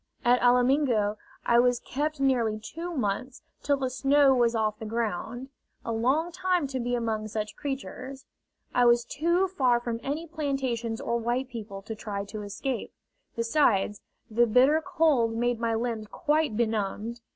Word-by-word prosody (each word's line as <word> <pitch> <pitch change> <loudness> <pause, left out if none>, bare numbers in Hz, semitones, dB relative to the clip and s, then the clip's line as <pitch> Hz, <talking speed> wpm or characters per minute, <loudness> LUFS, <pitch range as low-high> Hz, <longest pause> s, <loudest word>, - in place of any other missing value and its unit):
At 245 +1 +4
Alamingo 245 -3 +3 0.3
I 235 0 +5
was 245 0 +3
kept 300 +2 -3
nearly 240 -6 +1
two 330 +11 -6
months, 250 +3 -2 0.2
till 285 -1 +1
the 260 -2 -2
snow 275 +2 +4
was 240 -2 +2
off 215 -1 0
the 220 - -6
ground 235 +3 -3 0.4
a 230 - -2
long 265 +10 +1
time 360 -2 0
to 260 -1 -3
be 245 0 -1
among 220 -2 -2
such 215 0 -4
creatures! 270 -1 -6 0.5
I 245 - +4
was 240 0 +4
too 340 +8 +1
far 260 -10 +2
from 235 -1 -3
any 295 +4 -3
plantations 265 -8 -2
or 235 - -1
white 245 +3 -1
people 210 -5 -7
to 220 - -5
try 205 -2 -5
to 215 +1 -7
escape; 215 +5 -4 0.4
besides, 230 -4 +2 0.3
the 235 +1 +3
bitter 260 +8 +4
cold 310 -11 +2
made 240 0 0
my 230 -1 0
limbs 225 -2 -2
quite 300 -4 0
benumbed. 225 0 -1
240 Hz, 160 wpm, -27 LUFS, 225-275 Hz, 0.5 s, I